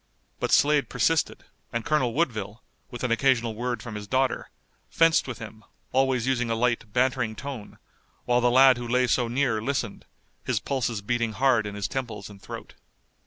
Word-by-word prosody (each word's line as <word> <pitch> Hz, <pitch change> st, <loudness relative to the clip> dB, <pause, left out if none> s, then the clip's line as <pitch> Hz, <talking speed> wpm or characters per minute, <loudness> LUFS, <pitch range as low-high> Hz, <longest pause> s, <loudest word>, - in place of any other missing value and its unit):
But -, -, -1 dB
Slade 145 Hz, -1 st, +4 dB
persisted, 150 Hz, +6 st, +1 dB, 0.3 s
and 115 Hz, -1 st, -3 dB
Colonel 130 Hz, -7 st, +1 dB
Woodville, 110 Hz, -, -2 dB, 0.3 s
with 120 Hz, -, -8 dB
an 125 Hz, -, 0 dB
occasional 115 Hz, -2 st, +2 dB
word 120 Hz, +2 st, -3 dB
from 120 Hz, -, -7 dB
his 105 Hz, -1 st, -6 dB
daughter, 130 Hz, +2 st, 0 dB, 0.4 s
fenced 165 Hz, -3 st, +3 dB
with 130 Hz, -, -5 dB
him, 110 Hz, -1 st, -10 dB, 0.3 s
always 130 Hz, -2 st, +2 dB
using 125 Hz, -2 st, 0 dB
a 115 Hz, -, +1 dB
light 115 Hz, -2 st, 0 dB
bantering 125 Hz, -2 st, +1 dB
tone, 135 Hz, -4 st, -7 dB, 0.5 s
while 125 Hz, 0 st, +2 dB
the 120 Hz, -, +4 dB
lad 130 Hz, 0 st, +6 dB
who 120 Hz, 0 st, -5 dB
lay 125 Hz, +2 st, +2 dB
so 120 Hz, 0 st, +1 dB
near 120 Hz, -3 st, 0 dB
listened, 125 Hz, -3 st, -3 dB, 0.4 s
his -, -, 0 dB
pulses 120 Hz, -6 st, -2 dB
beating 115 Hz, 0 st, -1 dB
hard 125 Hz, -4 st, +2 dB
in 100 Hz, -, -6 dB
his 100 Hz, -1 st, -2 dB
temples 115 Hz, -6 st, -5 dB
and 100 Hz, -1 st, -14 dB
throat. -, -, -9 dB
120 Hz, 175 wpm, -26 LUFS, 110-130 Hz, 0.5 s, lad